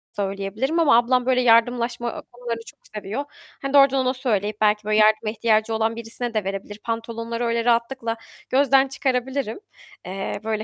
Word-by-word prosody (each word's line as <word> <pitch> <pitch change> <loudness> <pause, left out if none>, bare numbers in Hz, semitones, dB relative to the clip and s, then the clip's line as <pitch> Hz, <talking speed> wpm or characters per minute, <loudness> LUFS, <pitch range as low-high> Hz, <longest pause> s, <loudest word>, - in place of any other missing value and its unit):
söyleyebilirim. 200 - -2
Ama 285 -8 +5
ablam 245 +1 +2
böyle 255 0 +3
yardımlaşma 235 0 +2
konularını 240 -1 -5
çok - - -14 0.2
seviyor. 210 +7 -4 0.4
Hani, 275 0 -4
doğrudan 275 -1 +6
ona 255 - +2
söyleyip 215 -5 -2
belki 210 0 +3
böyle 215 0 +1
yardıma 215 0 +4
ihtiyacı 220 0 +1
olan 225 +1 0
birisine 230 +1 -5
de 215 -2 0
verebilir 195 +2 -5
pantolonları. 230 +1 -3
Öyle 230 0 0
rahatlıkla 235 0 0 0.3
gözden 270 0 +4
çıkarabilirim. 265 - -2 0.5
Eee, 195 +1 -4
böyle 215 -1 -2
230 Hz, 150 wpm, -23 LUFS, 215-250 Hz, 0.5 s, doğrudan